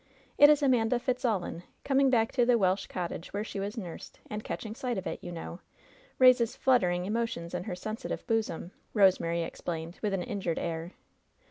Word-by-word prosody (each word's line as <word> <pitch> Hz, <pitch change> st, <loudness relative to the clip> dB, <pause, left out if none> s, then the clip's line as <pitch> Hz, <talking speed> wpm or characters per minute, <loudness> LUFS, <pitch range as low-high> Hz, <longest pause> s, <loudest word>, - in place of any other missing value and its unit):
"It 290 Hz, -, +10 dB
is 295 Hz, -1 st, +4 dB
Amanda 245 Hz, -3 st, +3 dB
Fitzallan, 240 Hz, -9 st, -1 dB, 0.2 s
coming 275 Hz, -1 st, +3 dB
back 225 Hz, -3 st, +2 dB
to 250 Hz, -, +2 dB
the 240 Hz, 0 st, +4 dB
Welsh 190 Hz, -2 st, +1 dB
cottage 175 Hz, -1 st, -5 dB
where 205 Hz, +1 st, -1 dB
she 210 Hz, -, -6 dB
was 200 Hz, +3 st, -4 dB
nursed, 180 Hz, -7 st, -8 dB
and 210 Hz, 0 st, -4 dB
catching 215 Hz, -1 st, -5 dB
sight 245 Hz, 0 st, -3 dB
of 190 Hz, -, -4 dB
it, -, -, -4 dB
you 175 Hz, -, -6 dB
know, 170 Hz, +1 st, -7 dB, 0.6 s
raises 250 Hz, -3 st, +5 dB
fluttering 180 Hz, -9 st, +2 dB
emotions 215 Hz, -5 st, -2 dB
in 180 Hz, 0 st, -3 dB
her -, -, -3 dB
sensitive 215 Hz, +7 st, -5 dB
bosom," 220 Hz, -6 st, -1 dB, 0.2 s
Rosemary 170 Hz, -4 st, +3 dB
explained, 165 Hz, 0 st, -5 dB
with 205 Hz, -2 st, 0 dB
an 180 Hz, -, -2 dB
injured 185 Hz, -5 st, -2 dB
air. 165 Hz, +1 st, -3 dB
210 Hz, 175 wpm, -30 LUFS, 175-240 Hz, 0.6 s, It